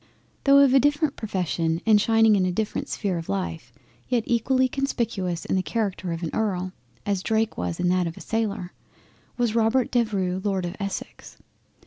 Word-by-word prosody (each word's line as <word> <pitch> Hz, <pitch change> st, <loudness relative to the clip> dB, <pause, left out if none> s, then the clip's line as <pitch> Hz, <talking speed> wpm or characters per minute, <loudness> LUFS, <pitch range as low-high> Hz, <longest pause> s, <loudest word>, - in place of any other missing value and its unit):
Though 275 Hz, 0 st, +7 dB
of 280 Hz, -2 st, +6 dB
a 270 Hz, -, +7 dB
different 290 Hz, +1 st, +1 dB
profession, 170 Hz, -5 st, -1 dB
and 215 Hz, -2 st, +5 dB
shining 225 Hz, 0 st, +4 dB
in 190 Hz, -, +2 dB
a 185 Hz, -, +1 dB
different 210 Hz, +4 st, -2 dB
sphere 190 Hz, -5 st, -2 dB
of 165 Hz, -, -9 dB
Life, 85 Hz, -4 st, -3 dB, 0.4 s
yet 245 Hz, -3 st, +1 dB
equally 255 Hz, +2 st, +2 dB
conspicuous 230 Hz, -10 st, -2 dB
in -, -, 0 dB
the 185 Hz, -, +2 dB
Character 195 Hz, -4 st, -2 dB
of 165 Hz, +1 st, -4 dB
an 165 Hz, -, -2 dB
Earl, 185 Hz, -4 st, -1 dB, 0.3 s
as 200 Hz, -2 st, 0 dB
Drake 220 Hz, +1 st, 0 dB
was 90 Hz, -1 st, -3 dB
in 180 Hz, -, +1 dB
that 180 Hz, -1 st, +2 dB
of 165 Hz, -, -7 dB
a -, -, -9 dB
Sailor, 205 Hz, -5 st, -2 dB, 0.6 s
was 240 Hz, -3 st, +1 dB
Robert 230 Hz, +2 st, +2 dB
Devereux 195 Hz, -7 st, 0 dB
Lord 190 Hz, -4 st, -1 dB
Essex. 200 Hz, -1 st, -6 dB
205 Hz, 175 wpm, -25 LUFS, 180-230 Hz, 0.6 s, Though